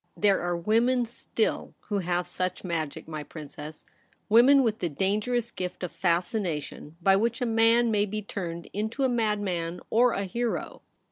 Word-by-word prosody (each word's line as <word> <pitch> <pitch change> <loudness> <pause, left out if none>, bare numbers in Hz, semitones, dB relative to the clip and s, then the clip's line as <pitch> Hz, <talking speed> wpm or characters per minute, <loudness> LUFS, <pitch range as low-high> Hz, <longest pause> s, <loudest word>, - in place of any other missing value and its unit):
There 200 -2 +3
are 175 0 -1
women 235 +7 +2
still 230 -1 -2
who 205 -1 -2
have 180 -1 -1
such 185 +1 -3
magic, 165 -5 -3
my 155 -1 -5
Princess 150 0 -9 0.2
— - - -39
women 260 +5 +7
with 220 -2 0
the 175 - -1
dangerous 215 - 0
gift 180 0 -5
of 180 - -3
fascination 170 -4 -2
by 195 +1 +6
which 230 +4 +1
a 250 - 0
man 230 +1 +4
may 210 -1 +2
be 215 +1 -4
turned 170 -4 -5
into 220 +6 -2
a - - +4
madman 205 -7 -1
or 240 +2 +4
a 200 - -1
hero. 235 +5 -3
200 Hz, 165 wpm, -27 LUFS, 175-230 Hz, 0.2 s, women